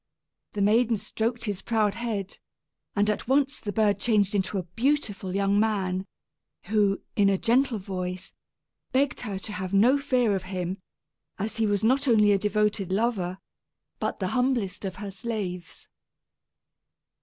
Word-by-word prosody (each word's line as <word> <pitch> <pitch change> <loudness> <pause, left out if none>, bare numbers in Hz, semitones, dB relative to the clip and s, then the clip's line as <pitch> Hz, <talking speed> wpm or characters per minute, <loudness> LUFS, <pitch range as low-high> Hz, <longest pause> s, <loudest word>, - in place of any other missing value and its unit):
The 205 - 0
maiden 225 +2 +3
stroked 230 +3 -2
his 205 -4 -3
proud 215 -3 +1
head, 215 -5 -4 0.6
and 205 0 +2
at 210 +1 -1
once 275 +2 +2
the 205 - -4
bird 205 -1 +2
changed 205 -3 +2
to 200 - -4
a 185 - -1
beautiful 205 - -1
young 200 +1 +2
man, 190 -3 0 0.6
who, 205 -2 +1
in 200 -1 +4
a 195 - +2
gentle 245 +3 +2
voice, 185 -2 -5 0.6
begged 270 +1 +1
her 205 -5 -4
to 200 +3 -6
have 190 0 -3
no 245 +8 +5
fear 250 -7 +2
of 190 - -2
him, 185 0 -3 0.6
as 220 +3 -4
he 225 -1 +2
was 205 -1 0
not 265 +5 +3
only 210 -4 +5
a 200 - +3
devoted 210 -2 0
lover 195 -4 0 0.6
but - - -2
the - - -1
humblest 250 -7 0
of 190 - -4
her 200 0 -6
slaves. 195 -5 -5
210 Hz, 155 wpm, -26 LUFS, 195-230 Hz, 0.6 s, no